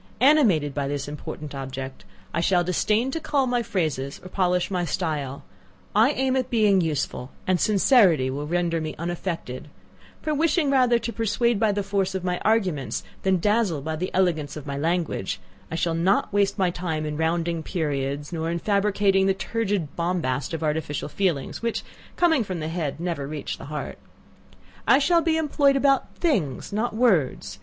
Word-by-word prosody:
Animated 225 - +4
by 140 -1 -2
this 140 0 -3
important 150 0 -7
object, 135 -5 -6 0.3
I 170 - 0
shall 175 0 +3
disdain 215 +7 +1
to 325 - -2
cull 290 -3 +1
my 245 -1 +1
phrases 155 - -2
or 185 - -9
polish 180 -1 +1
my 180 -2 0
style 150 -6 -2 0.5
I 220 +5 +6
aim 265 -1 +1
at 255 -2 0
being 210 -5 +4
useful, 150 -5 -2 0.2
and 185 -1 +2
sincerity 195 - +4
will 145 +2 -4
render 170 0 0
me 155 -1 -4
unaffected; 170 -5 -4 0.5
for 310 - -2
wishing 300 -1 +2
rather 250 -3 +4
to 235 0 -4
persuade 230 0 +1
by 220 -2 +3
the 205 0 -1
force 195 -1 -1
of 190 - -3
my 180 -1 -1
arguments, 190 - 0 0.2
than 190 -1 +2
dazzle 205 -4 +1
by 155 +3 -3
the 180 +4 -3
elegance 165 -6 0
of 150 - -8
my 140 -1 -4
language, 160 - -1 0.3
I - - -4
shall 170 0 0
not 185 +5 +1
waste 205 0 +2
my 185 -3 +2
time 165 -3 -3
in 150 0 -3
rounding 165 +1 0
periods, 145 -2 -2
nor 165 0 -2
in 170 - -1
fabricating 200 0 +2
the 195 - +2
turgid 200 -7 -2
bombast 170 -7 -1
of 160 - -5
artificial 150 -1 -2
feelings, 170 -6 -1
which, 230 -1 -2 0.3
coming 325 -7 +3
from 185 -4 -4
the 155 0 -3
head, 160 -3 -3
never 170 -5 -3
reach 150 -1 -5
the - - -8
heart. 150 +1 -5 0.9
I - - +7
shall 335 +4 +3
be 325 -1 +1
employed 285 -3 +3
about 275 -1 +2
things, 200 - -1
not 215 +2 -1
words! 200 - +1
180 Hz, 175 wpm, -25 LUFS, 155-220 Hz, 0.9 s, I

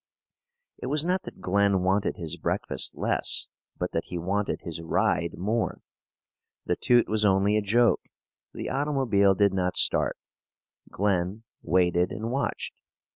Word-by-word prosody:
It - - -5
was 150 +3 +1
not 180 +1 +1
that - - -10
Glen 100 0 +2
wanted 100 +2 +1
his 85 -1 -4
breakfast - - -2
less, - - +1 0.3
but 90 - -3
that 80 - -2
he 90 - -6
wanted 100 +4 -2
his 85 -1 -6
ride 85 +1 0
more. 110 +5 -2 0.8
The - - 0
toot 120 -1 +3
was 110 0 +1
only 100 +1 +3
a 110 - +2
joke. 115 +4 +3 0.5
The - - -6
automobile 130 -9 +2
did 100 0 +3
not 90 -1 0
start. - - +3 0.7
Glen 100 +1 -1 0.2
waited 90 0 +2
and 110 +2 -4
watched. 140 +2 -3
100 Hz, 140 wpm, -27 LUFS, 90-115 Hz, 0.8 s, toot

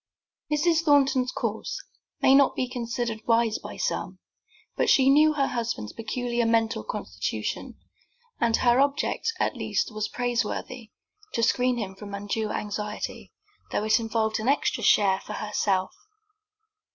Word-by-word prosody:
Mrs. 320 +2 +3
Thornton's 275 -5 +3
course - - -3 0.4
may 265 - +6
not 275 0 +5
be 255 - -1
considered 235 -2 -3
wise 230 -1 +2
by - - -9
some, - - -2 0.6
but - - +1
she 270 0 +5
knew 305 +2 +5
her 280 -2 +1
husband's 230 - -3
peculiar 240 +1 -2
mental 225 - +1
constitution, 105 - -4 0.6
and 230 -1 +3
her 240 0 +3
object 285 +10 +1
at - - 0
least - - -2
was 215 0 -2
praiseworthy, 245 -1 -3 0.4
to 230 - 0
screen 250 +2 +2
him 200 -4 -4
from 200 +1 -8
undue 205 +2 -2
anxiety, 210 0 -4 0.4
though - - 0
it 215 +2 +3
involved 220 -1 -1
an 220 - -3
extra 285 - +1
share 195 -2 +4
for - - -8
herself. 200 -3 -1
230 Hz, 140 wpm, -26 LUFS, 210-255 Hz, 0.6 s, may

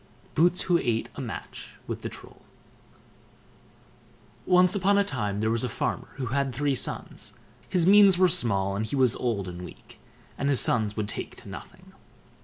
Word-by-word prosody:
BOOTS 175 +3 +3
WHO 175 -2 +2
ATE 115 -3 -1
A - - -7
MATCH - - -8
WITH - - -5
THE - - -4
TROLL - - -12 2.1
Once 180 0 +5
on 200 +1 +3
a 200 - +4
time 105 - -3
there 110 0 +1
was 115 +1 0
a 125 - -1
farmer - - -3
who 130 - -4
had 140 -3 -1
three 145 +1 0
sons; 125 - -4 0.3
his 175 -3 +2
means 200 -1 +7
were 185 0 +5
small, 100 - +1
and 110 +2 -2
he 125 - -3
was 130 -4 +4
old 110 -6 -2
and 90 0 -7
weak, 90 - -13 0.4
and 140 - 0
his 140 - +3
sons 110 -2 +2
would 105 -1 -2
take 105 - -4
to - - -12
nothing. - - -11
130 Hz, 180 wpm, -26 LUFS, 110-180 Hz, 2.1 s, means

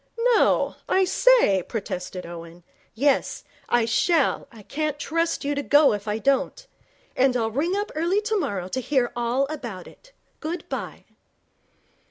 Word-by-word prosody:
'No 470 0 +2
I 380 0 +3
say 420 - +4
' - - -24
protested 185 -4 -5
Owen. 170 0 -10 0.3
'Yes, 275 +4 +1 0.3
I 240 -1 +3
shall. 310 +6 +1
I 225 -3 -14
can't 300 +4 -3
trust 330 +1 -1
you 290 - 0
to 285 - -2
go 290 -1 +5
if 205 0 -5
I 210 +1 -1
don't. 275 - 0 0.5
And 255 -1 +3
I'll 225 -1 -1
ring 320 - 0
up 410 +1 -2
early 340 +6 +1
tomorrow 385 - -2
to 260 +7 -3
hear 255 -2 +1
all 240 +3 0
about 240 - -7
it. - - -18 0.3
Good 330 +3 -5
bye.' - - -6
275 Hz, 155 wpm, -24 LUFS, 220-335 Hz, 0.5 s, go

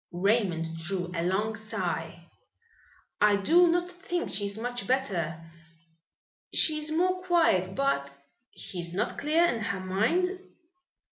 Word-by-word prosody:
Raymond 175 -4 0
drew 180 +1 -3
a 170 - -1
long 205 +5 0
sigh. 220 0 -4 1.0
"I 210 -1 +6
do 335 - +5
not 350 +1 +1
think 355 -1 -4
she 200 0 -1
is 200 +1 -2
much 245 +2 -4
better. 170 -11 -1 1.0
She 310 -1 +3
is 305 0 -2
more 365 +3 +1
quiet, 320 - +2
but 275 - 0 0.2
" 250 - -35
"She 180 - -7
is 170 0 -5
not 195 - -1
clear 315 +4 +3
in 240 -9 0
her 210 -3 -2
mind?" 210 - +1
220 Hz, 140 wpm, -28 LUFS, -, 1.0 s, I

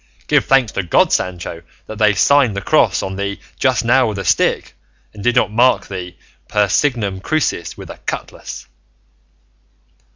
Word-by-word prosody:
Give - - +3
thanks 135 -6 +2
to - - -2
God, 85 - +2
Sancho, 90 -2 -2 0.2
that 110 -1 -9
they 105 -2 +4
signed 130 +1 +3
the 100 - -3
cross - - +2
on 95 0 -5
thee 100 0 -3 0.2
just 130 -3 +1
now 130 +2 +4
with 105 -2 -4
a 100 - -5
stick, - - +1 0.4
and 105 - -10
did 120 +1 +2
not 125 - +2
mark 125 +3 +3
thee 90 -2 -7 0.3
per 105 -1 +1
signum 105 -3 0
crucis 155 +9 -2
with - - -9
a - - -11
cutlass." - - -6
105 Hz, 165 wpm, -18 LUFS, 95-125 Hz, 0.4 s, they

